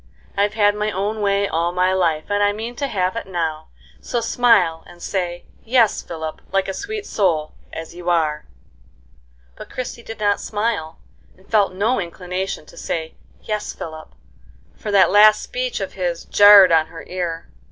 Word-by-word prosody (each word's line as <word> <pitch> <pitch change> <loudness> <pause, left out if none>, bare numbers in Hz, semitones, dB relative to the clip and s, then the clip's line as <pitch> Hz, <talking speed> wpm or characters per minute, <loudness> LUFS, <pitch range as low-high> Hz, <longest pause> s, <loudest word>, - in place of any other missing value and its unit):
I've 205 +1 +1
had 205 -2 +4
my 210 +1 -1
own 210 +2 -2
way 200 0 +1
all 170 0 0
my 180 +1 +1
life, 165 -4 +1
and 205 0 +1
I 205 0 +3
mean 225 +3 -6
to 280 - -1
have 185 -4 -1
it 230 - -5
now, 160 -4 -3 0.3
so 240 - -2
smile, 225 -9 +3
and 175 - -15
say, 175 -1 -3 0.2
'Yes, 230 -2 +3
Philip,' 160 -2 -6
like 195 0 +1
a 195 - -3
sweet 420 - -5
soul, 165 -7 0 0.2
as 165 0 -7
you 175 0 -5
are." 155 -3 0 1.1
But - - -11
Christie 250 -1 -6
did 225 -1 -9
not 205 -1 +2
smile, 210 -7 -2 0.4
and 190 - -23
felt 205 -4 +2
no 215 +6 +1
inclination 180 -1 -4
to - - -16
say 160 -1 -4 0.3
"Yes, 210 -1 -3
Philip," 160 -1 -9 0.6
for 215 - -7
that 200 -2 +5
last 210 +1 +6
speech - - -3
of - - -5
his - - -3
jarred 205 -3 +8
on 160 -1 +4
her 165 0 -10
ear. 175 -2 -4
195 Hz, 175 wpm, -21 LUFS, 170-215 Hz, 1.1 s, jarred